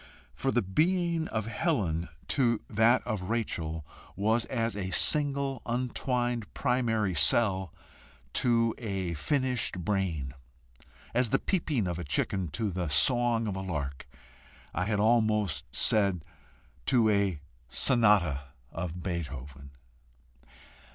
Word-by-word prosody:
For 135 Hz, -, -1 dB
the 120 Hz, -3 st, +1 dB
being 170 Hz, -, +1 dB
of 110 Hz, -2 st, -3 dB
Helen 110 Hz, -, -1 dB, 0.2 s
to 120 Hz, -5 st, +2 dB
that 115 Hz, +3 st, +3 dB
of 95 Hz, -4 st, -3 dB
Rachel 80 Hz, -9 st, -2 dB, 0.3 s
was 110 Hz, +4 st, +1 dB
as 115 Hz, -4 st, -2 dB
a 95 Hz, -2 st, -3 dB
single, 140 Hz, -, +2 dB
untwined 120 Hz, -1 st, -2 dB
primary 115 Hz, -6 st, 0 dB
cell 95 Hz, -, +3 dB, 0.6 s
to 115 Hz, -2 st, +2 dB
a 95 Hz, -6 st, -3 dB
finished 125 Hz, -, -1 dB
brain; 85 Hz, -10 st, -1 dB, 0.8 s
as 125 Hz, 0 st, +2 dB
the -, -, +3 dB
peeping 155 Hz, -, -1 dB
of 90 Hz, -1 st, -3 dB
a -, -, -4 dB
chicken 90 Hz, +5 st, -1 dB
to 105 Hz, +7 st, -2 dB
the 90 Hz, -2 st, -3 dB
song 120 Hz, -, +3 dB
of 100 Hz, -3 st, -3 dB
a 95 Hz, -, -4 dB
lark 70 Hz, -7 st, -4 dB, 0.7 s
I 90 Hz, -, -1 dB
had 105 Hz, -1 st, 0 dB
almost 110 Hz, -, +2 dB
said, 95 Hz, -, +3 dB, 0.6 s
to 120 Hz, -4 st, +4 dB
a 100 Hz, -6 st, +1 dB, 0.3 s
sonata 105 Hz, -, +3 dB, 0.3 s
of 85 Hz, +1 st, -5 dB
Beethoven. 70 Hz, -6 st, -5 dB
105 Hz, 115 wpm, -29 LUFS, 90-120 Hz, 0.8 s, to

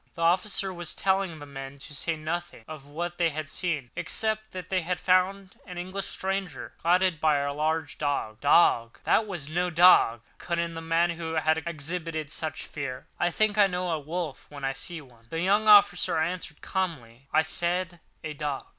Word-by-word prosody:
The 165 Hz, -, -3 dB
officer 190 Hz, +3 st, +1 dB
was 175 Hz, -2 st, -6 dB
telling 190 Hz, -3 st, +1 dB
the 145 Hz, -, -9 dB
men 135 Hz, -1 st, -8 dB
to 140 Hz, +2 st, -10 dB
say 165 Hz, +3 st, -2 dB
nothing 160 Hz, -5 st, -5 dB
of 155 Hz, -3 st, -9 dB
what 175 Hz, +4 st, -5 dB
they 170 Hz, -1 st, +3 dB
had 155 Hz, 0 st, -5 dB
seen, 155 Hz, -5 st, -3 dB
except 215 Hz, 0 st, -2 dB
that 185 Hz, -1 st, -8 dB
they 185 Hz, -1 st, +2 dB
found 185 Hz, +2 st, +1 dB
an 180 Hz, -2 st, -8 dB
English 185 Hz, +2 st, -4 dB
stranger, 195 Hz, -1 st, -4 dB
guarded 180 Hz, -1 st, +2 dB
by 155 Hz, -2 st, +4 dB
a 140 Hz, 0 st, -1 dB
large 155 Hz, +2 st, -1 dB
dog. 140 Hz, -7 st, -1 dB
"Dog! 120 Hz, -6 st, +4 dB
that 220 Hz, -, +3 dB
was 175 Hz, -8 st, -3 dB
no 175 Hz, +3 st, 0 dB
dog," 170 Hz, -9 st, +6 dB, 0.2 s
cut 170 Hz, -1 st, -2 dB
in 170 Hz, 0 st, -1 dB
the 165 Hz, -, -6 dB
man 165 Hz, +1 st, +2 dB
who 165 Hz, -1 st, -5 dB
had 160 Hz, 0 st, +2 dB
exhibited 160 Hz, -1 st, -3 dB
such 155 Hz, 0 st, -3 dB
fear. 135 Hz, -4 st, -5 dB
"I 175 Hz, -, +3 dB
think 215 Hz, +3 st, +1 dB
I 200 Hz, -, +7 dB
know 180 Hz, -1 st, -2 dB
a 160 Hz, -, 0 dB
wolf 160 Hz, 0 st, -5 dB
when 140 Hz, -2 st, -6 dB
I 135 Hz, -, 0 dB
see 160 Hz, +4 st, -5 dB
one." 120 Hz, -4 st, -20 dB
The 165 Hz, +4 st, -2 dB
young 205 Hz, +4 st, +3 dB
officer 200 Hz, -6 st, +6 dB
answered 160 Hz, -1 st, -2 dB
calmly: 135 Hz, -10 st, -4 dB
"I -, -, +4 dB
said 175 Hz, +1 st, -1 dB, 0.2 s
a 155 Hz, -1 st, -4 dB
dog." 145 Hz, -2 st, -3 dB
165 Hz, 190 wpm, -27 LUFS, 150-180 Hz, 0.2 s, I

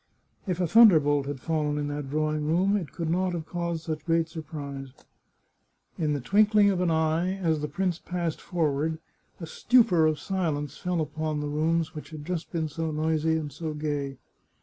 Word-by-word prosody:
If 180 Hz, -2 st, -1 dB
a 180 Hz, -, +2 dB
thunderbolt 155 Hz, -9 st, +6 dB
had 145 Hz, -2 st, -4 dB
fallen 150 Hz, -1 st, -1 dB
in 145 Hz, 0 st, -2 dB
that 145 Hz, -2 st, -4 dB
drawing 155 Hz, 0 st, -1 dB
room, 185 Hz, +6 st, +2 dB
it 180 Hz, -8 st, -3 dB
could 165 Hz, -, -4 dB
not 185 Hz, +1 st, +1 dB
have 165 Hz, -2 st, -4 dB
caused 170 Hz, -1 st, -3 dB
such 155 Hz, -2 st, -4 dB
great 165 Hz, -1 st, +1 dB
surprise. 145 Hz, -5 st, -7 dB, 1.0 s
In 155 Hz, -2 st, 0 dB
the 145 Hz, -, -1 dB
twinkling 205 Hz, -, +4 dB
of 185 Hz, -2 st, -1 dB
an 180 Hz, -, +2 dB
eye, 160 Hz, +3 st, +1 dB
as 160 Hz, -5 st, 0 dB
the 150 Hz, -, -2 dB
prince 180 Hz, 0 st, -1 dB
passed 175 Hz, -3 st, -3 dB
forward, 160 Hz, -2 st, -1 dB, 0.4 s
a 170 Hz, -, -5 dB
stupor 185 Hz, -3 st, +3 dB
of 155 Hz, -1 st, +1 dB
silence 150 Hz, -7 st, -2 dB
fell 180 Hz, +1 st, -1 dB
upon 155 Hz, 0 st, -2 dB
the 150 Hz, -, -3 dB
rooms 160 Hz, +2 st, 0 dB
which 150 Hz, -, -8 dB
had 155 Hz, -2 st, -9 dB
just 175 Hz, -1 st, -4 dB
been 160 Hz, -2 st, -1 dB
so 160 Hz, +2 st, -3 dB
noisy 160 Hz, +1 st, +1 dB
and 150 Hz, -2 st, -4 dB
so 155 Hz, +2 st, -5 dB
gay. 145 Hz, -3 st, -3 dB
160 Hz, 185 wpm, -27 LUFS, 150-175 Hz, 1.0 s, thunderbolt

